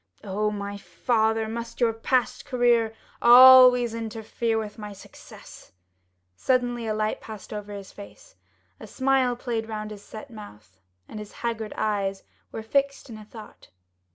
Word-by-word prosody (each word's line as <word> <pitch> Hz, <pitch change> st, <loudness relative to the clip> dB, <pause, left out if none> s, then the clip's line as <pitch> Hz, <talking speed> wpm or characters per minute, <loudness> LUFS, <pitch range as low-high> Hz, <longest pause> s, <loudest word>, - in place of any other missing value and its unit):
Oh, 210 Hz, +1 st, -1 dB
my 200 Hz, -1 st, -5 dB
father, 220 Hz, +4 st, 0 dB
must 230 Hz, +1 st, -7 dB
your 235 Hz, -2 st, +2 dB
past 245 Hz, +2 st, -1 dB
career 240 Hz, -3 st, +1 dB, 0.3 s
always 250 Hz, -1 st, +8 dB
interfere 225 Hz, 0 st, -3 dB
with 215 Hz, 0 st, -5 dB
my 210 Hz, -1 st, -7 dB
successes?" 195 Hz, -, -15 dB, 0.6 s
Suddenly 245 Hz, -, 0 dB
a 215 Hz, -, -1 dB
light 215 Hz, 0 st, -2 dB
passed 215 Hz, -2 st, -10 dB
over 210 Hz, 0 st, -7 dB
his 200 Hz, -1 st, -9 dB
face, 210 Hz, -, -14 dB, 0.4 s
a -, -, -10 dB
smile 260 Hz, -2 st, +1 dB
played 230 Hz, -2 st, -4 dB
round 215 Hz, -1 st, -5 dB
his 205 Hz, -1 st, -9 dB
set 220 Hz, +6 st, -11 dB
mouth, 105 Hz, -, -13 dB, 0.3 s
and 215 Hz, -, -8 dB
his 210 Hz, -1 st, -9 dB
haggard 225 Hz, -2 st, -3 dB
eyes 195 Hz, -2 st, -2 dB, 0.3 s
were 220 Hz, -, -6 dB
fixed 275 Hz, +2 st, -1 dB
in 215 Hz, -1 st, -9 dB
thought. 215 Hz, 0 st, -14 dB
220 Hz, 145 wpm, -25 LUFS, 210-240 Hz, 0.6 s, always